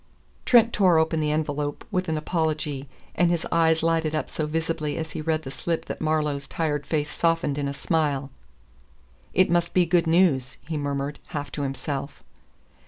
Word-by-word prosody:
Trent 235 -1 +5
tore 185 -5 +4
open 160 0 +2
the 150 -1 0
envelop 150 -1 -2
with 185 -3 -1
an 160 - 0
apology, 150 -4 -2 0.2
and 175 -1 +3
his 170 -2 0
eyes 160 -1 +3
lighted 165 -1 +1
up 155 - -2
so 155 - -2
visibly 160 -1 -2
as 160 -1 -4
he - - -4
read 155 0 0
the 135 - -6
slip 165 +5 -2
that - - -6
Marlowe's 150 -3 0
tired 150 -3 -2
face 150 -1 -1
softened 165 -2 +1
in 140 - -1
a 140 - -2
smile. 145 -3 0 1.0
"It 185 -2 +4
must 175 0 +1
be 180 -1 +5
good 170 0 +2
news," 160 -7 +3
he 160 - -3
murmured 145 0 -2
half 145 -3 -5
to 145 - -4
himself. 140 0 -4
155 Hz, 175 wpm, -25 LUFS, 145-165 Hz, 1.0 s, Trent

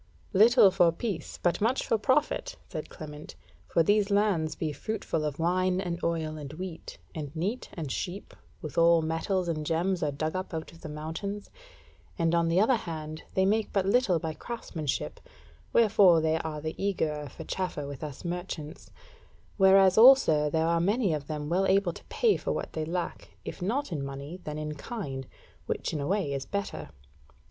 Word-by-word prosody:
"Little 215 0 +7
for 180 -3 +4
peace, 175 -1 -4
but 175 +2 +1
much 235 +5 +1
for - - +2
profit," 295 - +1
said - - -6
Clement; 150 -2 -9 0.3
"for 165 - +3
these 205 +3 +3
lands 200 -6 +2
be 155 -2 -2
fruitful 190 -5 -3
of 150 -2 -2
wine 185 +2 +1
and 175 -2 -3
oil 160 -2 -1
and 140 -2 -7
wheat, 175 0 -7 0.2
and 150 -3 -5
neat 200 +10 -2
and 155 -6 -4
sheep; 190 +7 -5 0.3
withal 165 +1 +4
metals 175 +3 -1
and 155 -2 -2
gems 170 +4 0
are 150 - +1
dug 155 +4 -3
up 185 -2 -4
out 160 0 -5
of 165 - -16
the 155 - -7
mountains; 160 +7 -5 0.7
and 165 -2 +1
on 170 -1 +3
the 165 +2 +3
other 230 +4 +4
hand, 155 -5 -6
they 190 - +3
make 215 +2 +1
but 195 -2 +1
little 200 -3 +3
by 160 -1 -3
craftsmanship, 160 - -4 0.5
wherefore 205 -5 +6
are 160 -1 0
they 155 +1 -3
the - - -8
eagerer 155 -7 -1
for 160 - -9
chaffer 180 -4 -3
with 140 -1 -7
us 150 +2 -7
merchants; 175 -3 -5 0.7
whereas 190 0 +6
also 220 - +7
there 160 +2 +1
are 170 0 +2
many 200 0 +2
of 145 -2 -4
them 150 -1 -4
well 185 +4 +2
able 195 -3 +3
to - - -12
pay 460 -4 +2
for - - -3
what - - -3
they 155 -1 -2
lack, 175 +2 -4
if - - -7
not 235 +7 -1
in 150 -4 -2
money, 140 +5 -6
then 150 0 -4
in 150 0 -4
kind, 140 - -6 0.4
which - - -2
in 155 - -2
a 140 - -2
way 190 -7 0
is 135 -1 -4
better. 200 -1 -4
170 Hz, 185 wpm, -28 LUFS, 155-195 Hz, 0.7 s, Little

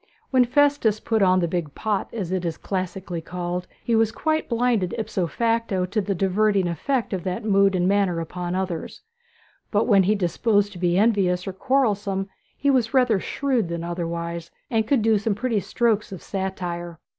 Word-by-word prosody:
When 255 -2 +5
Festus 280 -5 +2
put 220 -1 0
on 185 -1 +4
the 170 - +1
big 165 -4 -3
pot, 210 -3 -2
as 195 -6 -4
it 185 -1 -1
is 165 -2 -2
classically 185 -2 -4
called, 180 +1 -4 0.2
he 235 - 0
was 225 -1 +3
quite 315 +5 -1
blinded 235 -6 +1
ipso 205 -5 -1
facto 230 -1 0
to 210 +4 -1
the 200 0 -2
diverting 195 +1 +2
effect 225 - -1
of 185 -3 -2
that 185 +3 -3
mood 195 -2 +4
and 180 0 +2
manner 195 -3 +2
upon 175 +2 -4
others; 185 -3 -4 0.7
but 210 +1 +2
when 200 -5 +5 0.2
disposed 205 +3 +1
to 180 - -10
be 175 0 +2
envious 195 -4 +2
or 195 - -4
quarrelsome 205 -5 0 0.3
he 280 - +2
was 250 -1 +1
rather 245 -6 +4
shrewd 255 -3 -1
than 170 0 -3
otherwise, 170 -1 -4 0.2
and 220 -2 +1
could 255 -3 +2
do 220 -2 +3
some 205 0 -1
pretty 230 -1 0
strokes 215 +2 0
of 190 - -8
satire. 175 -3 -4
195 Hz, 180 wpm, -24 LUFS, 180-225 Hz, 0.7 s, When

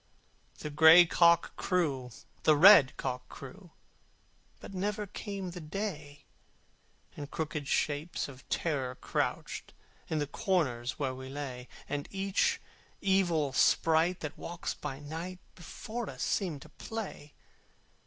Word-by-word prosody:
The 150 - -6
gray 160 +4 +8
cock 170 0 +4
crew, 145 -9 0 0.3
the 155 -1 +4
red 170 -5 +8
cock 125 -1 -4
crew, 175 +7 -11 0.9
But - - -10
never 205 +3 -2
came 200 -2 -6
the 175 0 -8
day: 155 -4 -5 0.9
And 145 -1 -7
crooked 150 -3 -4
shapes 150 +4 -1
of 130 -1 -13
Terror 135 -6 -1
crouched, - - -3 0.3
In 160 - -1
the 150 - 0
corners 135 -8 -1
where 135 -3 -1
we 130 0 -8
lay: 130 -3 -6 0.2
And 145 0 -3
each 195 0 0 0.4
evil 175 -8 +2
sprite 165 +5 +3
that 155 - -6
walks 170 0 -4
by 140 -3 -6
night 165 +5 -6 0.2
Before 225 +6 -6
us - - -5
seemed 170 -9 -1
to - - -15
play. 210 -10 -7
160 Hz, 125 wpm, -31 LUFS, 145-185 Hz, 0.9 s, gray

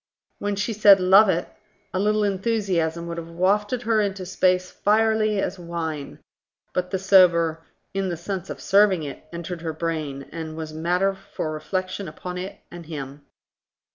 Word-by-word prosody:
When 205 0 -1
she 210 +3 -1
said, 205 -2 +7
"Love 190 +3 +6
it?" 175 -1 0 0.5
a 185 - 0
little 210 +1 +2
enthusiasm 190 -5 0
would 170 0 -5
have 165 0 -8
wafted 205 +7 +1
her 225 -2 +2
into 195 -2 -2
space 185 0 +1
fierily 215 0 +2
as 190 -1 -2
wine; 165 -4 -5 0.6
but 180 0 -1
the 190 - -1
sober, 175 -4 +4 0.3
"In 195 -1 -1
the 170 - -3
sense 190 +2 -5
of - - -6
serving 195 -4 +4
it", 140 -2 -7
entered 170 0 -6
her 165 -1 -3
brain, 155 -4 -3
and 160 -1 -6
was 155 -1 -6
matter 180 +5 +1
for 160 -4 -5
reflection 185 +5 -3
upon 180 +4 -6
it 185 +2 -6
and 175 -2 -10
him. 140 -2 -7
185 Hz, 165 wpm, -24 LUFS, 165-200 Hz, 0.6 s, said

